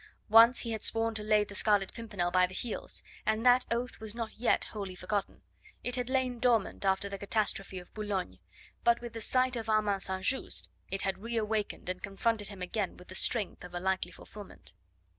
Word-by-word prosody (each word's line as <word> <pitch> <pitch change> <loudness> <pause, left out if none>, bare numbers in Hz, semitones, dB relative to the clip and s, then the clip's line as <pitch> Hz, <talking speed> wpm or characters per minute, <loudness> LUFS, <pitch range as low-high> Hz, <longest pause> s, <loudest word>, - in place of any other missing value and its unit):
Once 230 +3 +8
he 230 - -2
had 220 - -3
sworn 225 0 +1
to 220 - +1
lay 210 0 +3
the 205 - -10
Scarlet 200 -2 +2
Pimpernel 205 -6 -2
by 180 0 +4
the 185 - -10
heels, 230 0 -3 0.2
and 220 +2 0
that 250 0 +6
oath 240 +2 -2
was 220 0 -4
not 230 -2 -5
yet 240 - +3
wholly 200 -4 -5
forgotten; 200 +1 -3 0.4
it 245 - +2
had 250 -1 -2
lain 260 -2 0
dormant 230 -5 +2
after 195 +1 +1
the 200 0 -6
catastrophe 200 -2 -1
of 180 -1 -10
Boulogne, 195 - -3 0.4
but 235 0 +4
with 240 -1 -8
the 225 - -4
sight 255 +2 +2
of 225 -2 -4
Armand 210 -2 +2
St. 190 -1 -2
Just 265 - +1 0.2
it 195 0 -1
had 195 -1 -1
re 230 +3 -3
awakened 215 -3 -2
and 185 0 -3
confronted 205 +1 -1
him 195 -3 -7
again 195 +1 -2
with 180 - -15
the - - -8
strength 210 0 0
of 180 0 -9
a - - -1
likely 185 -1 -1
fulfilment. 205 +1 -10
210 Hz, 205 wpm, -31 LUFS, 195-230 Hz, 0.4 s, Once